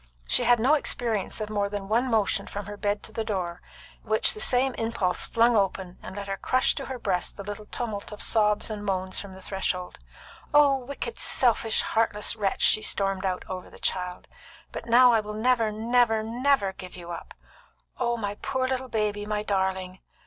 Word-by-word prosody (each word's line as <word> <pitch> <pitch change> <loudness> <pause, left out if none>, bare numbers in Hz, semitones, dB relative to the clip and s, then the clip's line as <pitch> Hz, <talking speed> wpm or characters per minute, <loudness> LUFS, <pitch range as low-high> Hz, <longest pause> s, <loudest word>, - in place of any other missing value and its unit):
She - - +2
had 245 -1 +5
no 260 +6 +4
experience 230 -8 0
of 215 0 -4
more 205 -1 0
than 200 -1 -5
one 235 +5 +1
motion 210 -3 +1
from 205 0 -6
her 205 +1 -7
bed 205 0 -1
to - - -9
the 225 0 -3
door, 180 -5 -3 0.4
which 220 0 +2
the - - -8
same 255 +3 +3
impulse 225 -6 -1
flung 235 +1 +3
open 190 -3 -1
and 190 - -9
let 200 0 -5
her 195 0 -3
crush 255 +5 +2
to 275 - -5
her 260 - -5
breast 190 -6 -1
the 200 - -6
little 205 +1 -7
tumult 220 -5 -4
of 210 - -8
sobs 210 -1 +2
and 210 -1 -5
moans 190 -2 -1
from 195 -2 -8
the 190 - -12
threshold. 185 -2 -3 0.6
"Oh, 290 -2 +7
wicked, 250 -2 -6
selfish, 230 -3 +3
heartless 220 -1 +1
wretch!" 200 -3 -1
she 215 - +4
stormed 195 -2 +1
out 185 -1 -3
over 185 -1 -6
the - - -14
child. 180 -1 -2 0.4
"But 230 - -7
now 245 +1 +7
I 225 - +4
will 210 0 -5
never, 225 -1 +2
never, 225 0 +2
never 235 -3 +1
give 185 -1 -10
you 175 -1 -8
up! 170 - -8 0.6
Oh, 240 -1 0
my 205 -2 -4
poor 260 -1 -1
little 260 0 -2
baby! 210 -2 -1
my 210 0 -1
darling! 190 -2 -1
210 Hz, 195 wpm, -26 LUFS, 195-235 Hz, 0.6 s, Oh